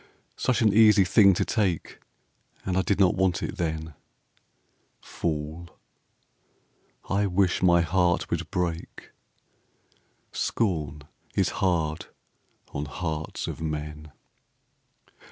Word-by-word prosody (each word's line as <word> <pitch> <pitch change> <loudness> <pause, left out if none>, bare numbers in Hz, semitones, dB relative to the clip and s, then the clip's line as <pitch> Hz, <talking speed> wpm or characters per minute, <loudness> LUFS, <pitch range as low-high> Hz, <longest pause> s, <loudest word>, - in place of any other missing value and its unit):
Such 130 -2 +1
an 105 -2 +4
easy 105 -2 +6
thing 100 0 +6
to - - 0
take, 95 -7 -1 0.7
And 95 - -1
I 95 - +3
did 100 +1 0
not 95 -2 +5
want 95 -2 0
it 105 - -4
then; 80 -3 -3 1.1
Fool! 80 +1 -4 1.4
I 100 +1 +1
wish 95 -1 +1
my 85 -1 +5
heart 90 +1 +1
would - - -2
break, 85 -1 -4 1.2
Scorn 75 -9 -1 0.3
is - - +2
hard 80 -4 0 0.7
on 70 - -3
hearts 80 0 -4
of - - -6
men. 75 -1 -5
85 Hz, 105 wpm, -26 LUFS, 80-95 Hz, 1.4 s, easy